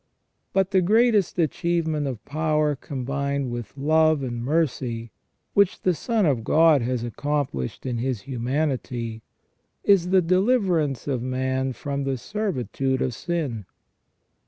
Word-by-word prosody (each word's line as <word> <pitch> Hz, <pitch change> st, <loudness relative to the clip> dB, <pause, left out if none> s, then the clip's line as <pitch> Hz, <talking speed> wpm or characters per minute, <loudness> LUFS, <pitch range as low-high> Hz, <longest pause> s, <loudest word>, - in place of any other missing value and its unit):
But 190 Hz, 0 st, +1 dB
the 190 Hz, -1 st, +4 dB
greatest 215 Hz, 0 st, +3 dB
achievement 160 Hz, -2 st, 0 dB
of 125 Hz, -5 st, -6 dB
power 155 Hz, 0 st, +1 dB
combined 140 Hz, 0 st, -3 dB
with 120 Hz, +2 st, -6 dB
love 155 Hz, +1 st, +3 dB
and 120 Hz, -2 st, -4 dB
mercy, 125 Hz, -6 st, -1 dB, 0.4 s
which 200 Hz, -2 st, +3 dB
the 185 Hz, -, +2 dB
Son 220 Hz, +4 st, 0 dB
of 130 Hz, -7 st, +1 dB
God 160 Hz, +1 st, +5 dB
has 120 Hz, 0 st, -1 dB
accomplished 130 Hz, -, -3 dB
in 120 Hz, -3 st, -2 dB
His 125 Hz, -3 st, -2 dB
humanity, 125 Hz, -2 st, -2 dB, 0.6 s
is 185 Hz, -3 st, +4 dB
the 185 Hz, -1 st, +4 dB
deliverance 185 Hz, -, +1 dB
of 130 Hz, -4 st, -1 dB
man 130 Hz, +1 st, -1 dB
from 140 Hz, +2 st, -3 dB
the 135 Hz, -1 st, -1 dB
servitude 135 Hz, -, -2 dB
of 125 Hz, -, -1 dB
sin. 140 Hz, -, -3 dB
140 Hz, 130 wpm, -24 LUFS, 125-170 Hz, 0.6 s, God